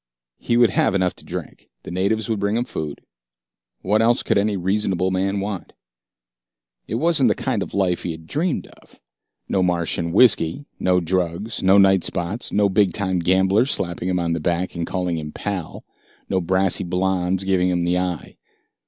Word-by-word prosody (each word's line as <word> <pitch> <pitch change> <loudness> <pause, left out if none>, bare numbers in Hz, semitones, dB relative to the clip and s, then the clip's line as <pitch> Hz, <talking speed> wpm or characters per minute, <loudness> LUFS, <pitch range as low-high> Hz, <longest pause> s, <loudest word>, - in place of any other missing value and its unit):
He 120 - 0
would 120 -4 +5
have 95 - +2
enough 95 -2 +1
to - - -13
drink. - - -8
The - - -8
natives 100 +4 0
would 110 -3 -1
bring 100 +2 0
him 120 - 0
food. 75 - -5 0.8
What 105 +3 +2
else 120 +1 +3
could - - +1
any 105 0 0
reasonable 95 0 0
man 95 +2 0
want? 100 -3 -5 1.1
It 110 - -3
wasn't 155 +1 +2
the - - +2
kind - - -2
of - - -5
life 95 -3 +1
he - - -4
had 80 0 -9
dreamed 155 - -1 0.2
of. - - -22 0.5
No 95 - +1
Martian 85 -2 0
whiskey, 105 - +3
no 90 -1 +2
drugs, 90 +5 -2
no 95 +1 +5
night 95 -2 +5
spots, 90 +7 -3
no 105 0 +3
bigtime 95 -1 +1
gamblers 95 +7 +3
slapping 85 -3 -1
him 90 - +1
on 85 -1 0
the 85 - -1
back 85 +3 -1
and 85 -1 -4
calling 90 -3 -2
him 75 -1 -6
"pal," 95 -3 -5 0.4
no 95 - 0
brassy 95 +2 +2
blondes 90 +1 0
giving 95 -1 +2
him 90 -1 0
the 90 +1 +1
eye. 90 -3 -4
95 Hz, 180 wpm, -22 LUFS, 90-100 Hz, 1.1 s, would